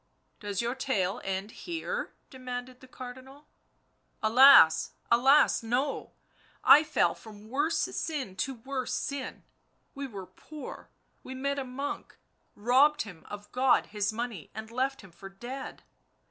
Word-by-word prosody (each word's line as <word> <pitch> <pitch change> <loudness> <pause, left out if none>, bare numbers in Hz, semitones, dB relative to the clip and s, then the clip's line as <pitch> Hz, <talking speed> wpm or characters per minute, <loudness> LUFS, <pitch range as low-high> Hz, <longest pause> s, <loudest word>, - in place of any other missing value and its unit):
u 205 - -9
Does 200 +2 -1
your 235 +1 -1
tale 205 -8 -1
end 195 +2 -3
here?" 355 - -5 0.2
demanded 255 -1 -7
the 260 - -15
Cardinal. 255 +1 -10
u 290 - -20 0.9
Alas! 245 -10 +7 0.2
alas! 265 +5 +5
no; 250 +5 -2 0.5
I 300 - +8
fell 310 0 +2
from 215 -1 -14
worse 290 +6 0
sin 270 - -3
to 270 +5 -2
worse 255 +1 -4
sin 275 0 -4 0.3
— - - -43
we 280 0 -5
were 200 -6 -8
poor, 290 +11 -10 0.3
we 260 - -8
met 280 +2 -2
a - - -2
monk, 270 +3 -6 0.4
robbed 260 +8 +4
him 180 -6 -12
of 205 0 -9
God 255 0 +3
His 210 0 0
money, 225 -7 -5
and 220 +1 -7
left 265 +3 -1
him 195 -3 -15
for 195 +3 -11
dead 245 +7 -8
255 Hz, 145 wpm, -29 LUFS, 210-275 Hz, 0.9 s, I